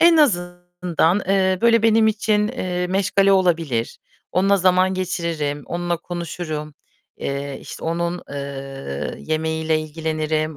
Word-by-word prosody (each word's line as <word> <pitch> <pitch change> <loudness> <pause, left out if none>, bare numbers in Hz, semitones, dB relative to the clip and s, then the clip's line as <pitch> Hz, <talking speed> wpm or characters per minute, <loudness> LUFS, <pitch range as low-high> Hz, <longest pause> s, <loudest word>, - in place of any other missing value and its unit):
en 335 0 +7
azından, 175 - +1
eee, 190 -1 +3
böyle, 230 -1 +5
benim 225 0 +5
için, 210 -1 +1
eee, 180 -7 -2
meşgale 195 +1 +3
olabilir. 165 -11 +1 0.3
Onunla 195 +2 +4
zaman 185 0 +3
geçiririm, 170 -6 -2
onunla 175 0 -1
konuşurum, 160 -3 -5 0.4
eee, 140 0 -4
işte, - - -9
onun, 170 +2 -1
eee, 135 - -5
yemeğiyle 160 0 0
ilgilenirim, 155 0 -2
175 Hz, 115 wpm, -21 LUFS, 155-190 Hz, 0.4 s, en